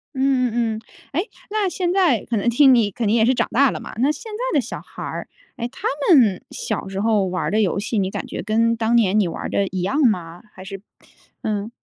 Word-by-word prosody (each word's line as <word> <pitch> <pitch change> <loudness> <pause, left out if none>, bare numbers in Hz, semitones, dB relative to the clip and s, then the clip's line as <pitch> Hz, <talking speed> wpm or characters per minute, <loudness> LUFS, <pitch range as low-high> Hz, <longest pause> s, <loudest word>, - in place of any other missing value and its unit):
嗯 260 -2 +2
嗯 230 -1 0
嗯， 215 - -7 0.3
诶， 350 - -1 0.2
那 425 -1 0
现 350 0 -1
在 355 - +3
可 230 - -1
能 205 - -1
听 265 +2 +6
你 220 -4 +2
肯 225 +3 -2
定 210 - +3
也 220 -1 +4
是 255 - +4
长 - - 0
大 270 0 +4
了 - - -5
嘛， - - -9
那 270 +6 +3
现 430 +9 -8
在 - - -2
的 275 - +4
小 240 - -6
孩 - - -12
儿， - - -5 0.3
哎， 235 - -3
他 245 - -5 0.3
们 215 -9 +4
小 215 -6 -4
时 195 0 -4
候 215 -2 +2
玩 185 0 -2
儿 - - -1
的 215 +2 +2
游 195 0 +1
戏， 215 +3 -2
你 190 -1 0
感 - - -5
觉 - - -5
跟 230 +2 +2
当 230 +1 +1
年 215 -3 +4
你 200 - +2
玩 165 - -6
儿 - - -3
的 200 - +1
一 185 -1 -3
样 265 +12 0
吗？ 175 -5 -3
还 185 - -11
是 195 0 -8 0.6
嗯。 215 0 -2
230 Hz, 270 characters per minute, -21 LUFS, 200-265 Hz, 0.6 s, 听